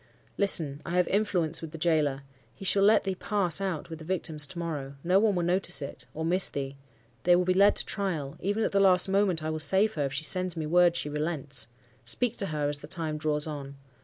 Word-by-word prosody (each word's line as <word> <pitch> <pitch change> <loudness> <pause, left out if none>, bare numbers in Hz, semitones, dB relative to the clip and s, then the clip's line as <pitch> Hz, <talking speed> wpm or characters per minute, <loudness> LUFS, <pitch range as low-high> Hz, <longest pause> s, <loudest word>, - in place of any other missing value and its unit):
"'Listen! 155 -8 +5
I 175 +1 -3
have 180 - +2
influence 185 -6 -1
with 165 - -7
the - - -7
gaoler. 150 -4 0 0.3
He 195 - -10
shall 195 +1 +3
let 210 +2 +4
thee 195 - -2
pass 190 -2 0
out 180 -4 -4
with 160 - -7
the - - -10
victims 160 -4 -2
to 190 - -11
morrow. 150 -5 -5
No 180 +3 +3
one 210 -2 +2
will 175 - -1
notice 175 -4 +1
it, 140 -1 -8
or 160 +1 -4
miss 180 +3 +3
thee—. 135 -1 -5 0.5
They 175 0 +4
will 180 0 +1
be 185 - +2
led 200 +2 +4
to - - -3
trial,—even 195 +3 -3
at - - -1
the 200 - +1
last 185 -1 +5
moment, 190 -4 +1
I 155 - -2
will 155 - -4
save 195 +7 +3
her, 145 -3 -2
if 135 - -4
she 150 +2 -2
sends 180 +3 +3
me 160 - -3
word 175 +2 +3
she 160 - -3
relents. 150 -4 -3 0.4
Speak 225 - -1
to 195 - 0
her, 150 -3 -2
as 145 0 -3
the 150 - -11
time 155 -2 -4
draws 150 -1 -1
on. 140 -3 -7
170 Hz, 235 wpm, -27 LUFS, 150-190 Hz, 0.5 s, Listen